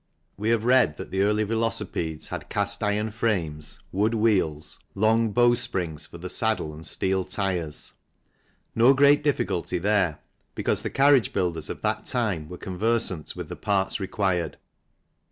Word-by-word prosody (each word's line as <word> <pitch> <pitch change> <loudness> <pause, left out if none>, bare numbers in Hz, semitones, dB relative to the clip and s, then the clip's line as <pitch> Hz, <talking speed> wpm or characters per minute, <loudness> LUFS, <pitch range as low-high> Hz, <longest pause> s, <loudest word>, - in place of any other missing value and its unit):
We 105 +3 -2
have 115 -2 +2
read 125 -11 +4
that - - -8
the 95 - 0
early 105 +2 +2
velocipedes 105 -8 -2
had - - -6
cast 100 0 -1
iron 105 +1 0
frames, 85 -10 -2
wood 105 +4 +1
wheels, 95 -9 +1 0.2
long 110 +2 +3
bow 120 +3 +4
springs 85 - -1
for 85 - -11
the 90 +2 -6
saddle 110 -6 0
and 80 +1 -10
steel 95 +2 0
tyres. 90 -6 -3 0.8
No 120 +4 +5
great 140 +1 +5
difficulty 110 - 0
there, 95 -4 +1 0.4
because - - 0
the - - -3
carriage 135 -5 +4
builders 85 -5 -1
of - - -6
that - - -1
time 100 -11 -1
were 90 - -7
conversant 95 -3 -1
with - - -6
the - - -6
parts 100 -1 0
required. 95 -4 -1
100 Hz, 155 wpm, -25 LUFS, 85-115 Hz, 0.8 s, No